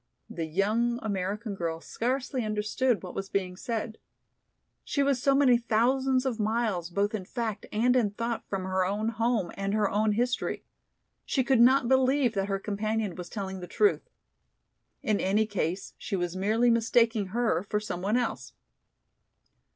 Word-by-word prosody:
The 165 Hz, -2 st, -4 dB
young 215 Hz, +8 st, +1 dB
American 205 Hz, +1 st, -2 dB
girl 165 Hz, -4 st, -3 dB
scarcely 255 Hz, -, -2 dB
understood 215 Hz, +3 st, 0 dB
what 180 Hz, -, -7 dB
was 195 Hz, 0 st, -5 dB
being 185 Hz, -2 st, -2 dB
said. 220 Hz, +2 st, -4 dB, 0.8 s
She 280 Hz, -, 0 dB
was 275 Hz, -3 st, +1 dB
so 275 Hz, 0 st, +3 dB
many 260 Hz, -4 st, +5 dB
thousands 255 Hz, +3 st, +2 dB
of 245 Hz, -4 st, -1 dB
miles 215 Hz, -5 st, 0 dB
both 200 Hz, +4 st, 0 dB
in 210 Hz, -3 st, -3 dB
fact 220 Hz, +1 st, -4 dB
and 245 Hz, +4 st, +2 dB
in 235 Hz, -5 st, +3 dB
thought 230 Hz, +3 st, -3 dB
from 195 Hz, -2 st, -2 dB
her 185 Hz, 0 st, 0 dB
own 205 Hz, +4 st, -1 dB
home 225 Hz, -5 st, 0 dB
and 195 Hz, +1 st, -2 dB
her 210 Hz, -1 st, +2 dB
own 210 Hz, +1 st, +2 dB
history. 245 Hz, +3 st, -1 dB, 0.6 s
She 265 Hz, -, 0 dB
could 260 Hz, -2 st, +3 dB
not 255 Hz, +1 st, +5 dB
believe 260 Hz, -1 st, +3 dB
that 195 Hz, -2 st, -1 dB
her 195 Hz, -, +1 dB
companion 210 Hz, 0 st, -2 dB
was 175 Hz, 0 st, -8 dB
telling 190 Hz, -3 st, -5 dB
the 180 Hz, -, -7 dB
truth. 420 Hz, -, +1 dB, 0.9 s
In 215 Hz, -2 st, +1 dB
any 205 Hz, +3 st, +2 dB
case 190 Hz, -3 st, -3 dB
she 200 Hz, -, -3 dB
was 175 Hz, -1 st, -2 dB
merely 220 Hz, +5 st, +2 dB
mistaking 230 Hz, -2 st, +2 dB
her 230 Hz, -1 st, 0 dB
for 210 Hz, -, +1 dB
some 210 Hz, -4 st, -5 dB
one 210 Hz, +5 st, +1 dB
else. 245 Hz, -, -3 dB
215 Hz, 165 wpm, -28 LUFS, 195-240 Hz, 0.9 s, many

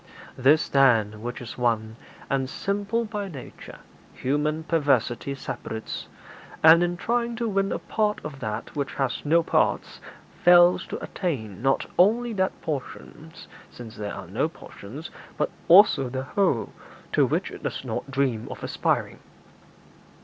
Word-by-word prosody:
'This, 145 Hz, +5 st, +4 dB
then, 110 Hz, -6 st, +3 dB
which 120 Hz, +2 st, -5 dB
is 120 Hz, +1 st, -8 dB
one, 110 Hz, -2 st, 0 dB, 0.3 s
and 135 Hz, -1 st, -1 dB
simple 205 Hz, +7 st, -1 dB
by 210 Hz, -2 st, -4 dB
nature, 140 Hz, -9 st, -10 dB, 0.4 s
human 150 Hz, +4 st, -1 dB
perversity 140 Hz, -5 st, +1 dB
separates, 110 Hz, -4 st, -6 dB, 0.6 s
and, 160 Hz, +2 st, +8 dB
in 175 Hz, 0 st, 0 dB
trying 235 Hz, +3 st, -1 dB
to 235 Hz, +1 st, -2 dB
win 195 Hz, -2 st, 0 dB
a -, -, 0 dB
part 210 Hz, -1 st, -1 dB
of 145 Hz, -3 st, -7 dB
that 110 Hz, -4 st, -5 dB
which 140 Hz, -2 st, -3 dB
has 135 Hz, -3 st, -1 dB
no 165 Hz, +3 st, +3 dB
parts, -, -, 0 dB, 0.4 s
fails 175 Hz, 0 st, +6 dB
to -, -, -4 dB
attain 110 Hz, -, -4 dB
not 135 Hz, +1 st, +1 dB
only 230 Hz, +5 st, +4 dB
that 190 Hz, -2 st, -1 dB
portion 155 Hz, +1 st, -6 dB, 0.4 s
(since 115 Hz, -3 st, -11 dB
there 105 Hz, -1 st, -5 dB
are 100 Hz, -, -8 dB
no 100 Hz, -, -1 dB
portions), 145 Hz, 0 st, -10 dB, 0.3 s
but -, -, 0 dB, 0.2 s
also 175 Hz, -7 st, +6 dB
the 130 Hz, +1 st, -3 dB
whole, 140 Hz, -, 0 dB, 0.4 s
to -, -, +4 dB
which -, -, 0 dB
it -, -, -10 dB
does -, -, -4 dB
not -, -, -4 dB
dream 135 Hz, -5 st, -1 dB
of -, -, -8 dB
aspiring.' -, -, -1 dB
145 Hz, 145 wpm, -25 LUFS, 125-180 Hz, 0.6 s, and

